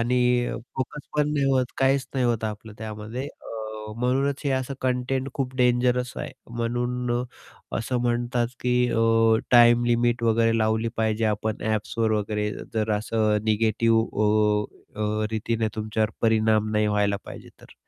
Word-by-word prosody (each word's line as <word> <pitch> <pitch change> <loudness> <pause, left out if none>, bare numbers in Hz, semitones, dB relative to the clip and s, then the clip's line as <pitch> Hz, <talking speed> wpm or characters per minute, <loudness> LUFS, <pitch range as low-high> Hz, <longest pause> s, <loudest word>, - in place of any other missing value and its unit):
आणि 125 +2 +1 0.6
फोकस 135 +3 -5
पण 150 0 +2
नाही 145 -2 +1
होत, 130 -2 +2
काहीच 135 0 +2
नाही 130 -2 +1
होत 115 -2 0
आपलं 110 0 -5
त्यामध्ये. 110 +3 -6
अ, 110 -4 -8
म्हणूनच 135 +3 0
हे 140 - +1
असं 130 +1 -1
कंटेंट 130 +1 -1
खूप 130 -2 -3
डेंजरस 125 0 +2
आहे. - - -5 0.2
म्हणून 120 +1 -2
अ, - - -2 0.6
असं 120 +2 -2
म्हणतात 120 0 0
की 125 0 +1 0.2
अ, 115 0 +1 0.5
टाईम 120 0 +6
लिमिट 120 0 +1
वगैरे 115 0 +3
लावली 110 +1 +1
पाहिजे 110 0 0
आपण 110 0 -1
ॲप्सवर 110 +1 0
वगैरे, 105 0 -1 0.2
जर 110 0 0
असं 110 -1 +1
निगेटिव्ह 110 +1 +2 0.2
अ, 105 0 +3 0.4
अ, 105 0 0
रीतीने 110 0 -1
तुमच्यावर 110 0 -1
परिणाम 110 -1 +3
नाही 105 0 +2
व्हायला 105 -1 +1
पाहिजे - - -10
तर. - - -16
115 Hz, 150 wpm, -25 LUFS, 110-125 Hz, 0.6 s, टाईम